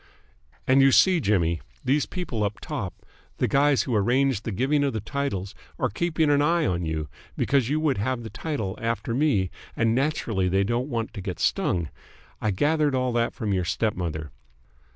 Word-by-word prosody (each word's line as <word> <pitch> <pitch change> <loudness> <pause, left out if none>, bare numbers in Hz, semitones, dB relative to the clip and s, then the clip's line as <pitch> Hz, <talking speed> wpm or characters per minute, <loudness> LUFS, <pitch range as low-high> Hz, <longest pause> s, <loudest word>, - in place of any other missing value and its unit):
"And 130 +1 +5
you 135 0 +6
see, 185 +5 +5
Jimmy, 85 - +1 0.2
these 140 +3 +2
people 155 - -3
up 105 0 -2
top, - - -6 0.3
the - - +1
guys 140 0 +3
who 125 - -3
arrange 120 +2 +2
the 115 - -4
giving 135 +8 +1
of 110 -7 -2
titles, 125 -10 -3 0.2
are - - 0
keeping 160 - +1
an 145 0 +4
eye 165 +3 +2
on 90 -2 0
you, 80 -1 -2 0.3
because 135 -4 +2
you 150 +2 +1
would 145 -8 +1
have 120 +2 -1
the 110 - -7
title 110 -7 -3
after 115 -1 -2
me 115 - +1 0.2
and 115 0 +2
naturally 115 -8 0
they 95 +2 +2
don't 120 +6 -1
want 115 -4 -3
to 100 - -6
get 90 -3 -5
stung. 85 -4 0 0.5
I 110 - +1
gathered 145 +7 +2
all 130 -1 0
that 115 0 0
from 110 -6 -2
your 95 -1 +1
stepmother. 85 - -2
120 Hz, 180 wpm, -25 LUFS, 100-140 Hz, 0.5 s, you